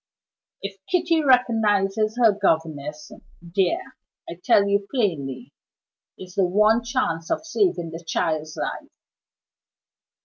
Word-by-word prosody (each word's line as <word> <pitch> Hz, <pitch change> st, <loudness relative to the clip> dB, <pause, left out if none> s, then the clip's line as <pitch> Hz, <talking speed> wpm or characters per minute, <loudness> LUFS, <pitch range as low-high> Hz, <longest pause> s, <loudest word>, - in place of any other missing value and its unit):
If 200 Hz, 0 st, -6 dB
Kitty 335 Hz, -3 st, +2 dB
recognizes 220 Hz, -4 st, +2 dB
her 230 Hz, -3 st, +5 dB
governess 160 Hz, -6 st, -2 dB, 0.3 s
there, 190 Hz, -, -2 dB, 0.3 s
I 170 Hz, -, -8 dB
tell 200 Hz, -1 st, +4 dB
you 200 Hz, 0 st, 0 dB
plainly, 140 Hz, -, -2 dB, 0.6 s
is 185 Hz, -1 st, -11 dB
the 195 Hz, -, +2 dB
one 215 Hz, +5 st, +3 dB
chance 235 Hz, -10 st, -2 dB
of -, -, -2 dB
saving 320 Hz, -, 0 dB
the 165 Hz, +1 st, -8 dB
child's 155 Hz, -1 st, -2 dB
life." -, -, -4 dB
200 Hz, 110 wpm, -23 LUFS, 165-230 Hz, 0.6 s, her